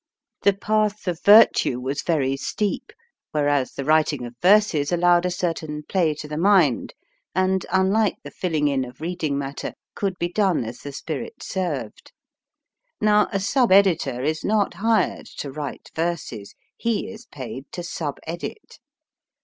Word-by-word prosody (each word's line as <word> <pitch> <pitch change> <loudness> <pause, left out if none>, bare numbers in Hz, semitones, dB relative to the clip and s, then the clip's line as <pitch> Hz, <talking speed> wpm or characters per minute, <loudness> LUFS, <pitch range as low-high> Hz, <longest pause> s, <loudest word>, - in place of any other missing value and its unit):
The 200 - +4
path 210 0 0
of 175 -2 -2
virtue 205 - +6
was 135 +3 -3
very 140 -5 +1
steep, 205 +9 -3 0.4
whereas 145 -3 +1
the 140 - -5
writing 155 -4 +2
of 120 - -8
verses 185 -7 +4
allowed 175 0 +4
a - - 0
certain 165 -4 -3
play 165 -3 +1
to 150 0 -7
the 150 +1 -4
mind, 200 - +3 0.4
and, 185 0 +1
unlike 195 +3 +2
the - - -9
filling 155 -5 0
in 135 -2 +1
of 125 0 -10
reading 160 -3 -2
matter, 140 0 -5 0.2
could 195 -3 -2
be 175 - -1
done 185 - +1
as 115 +2 -7
the 145 - -7
spirit 140 -2 -6
served. 160 - -4 0.9
Now, 210 0 +4
a 200 - 0
sub 235 +4 +2
editor 185 -10 +4
is 155 +2 -1
not 210 -2 +1
hired 215 +2 0
to 140 - -5
write 145 +1 -7
verses: 165 -11 -3 0.2
he 225 -2 -1
is 230 +1 -10
paid 135 - -8
to 175 - -5
sub 160 -4 -4
edit. 170 - -7
170 Hz, 155 wpm, -23 LUFS, 145-195 Hz, 0.9 s, virtue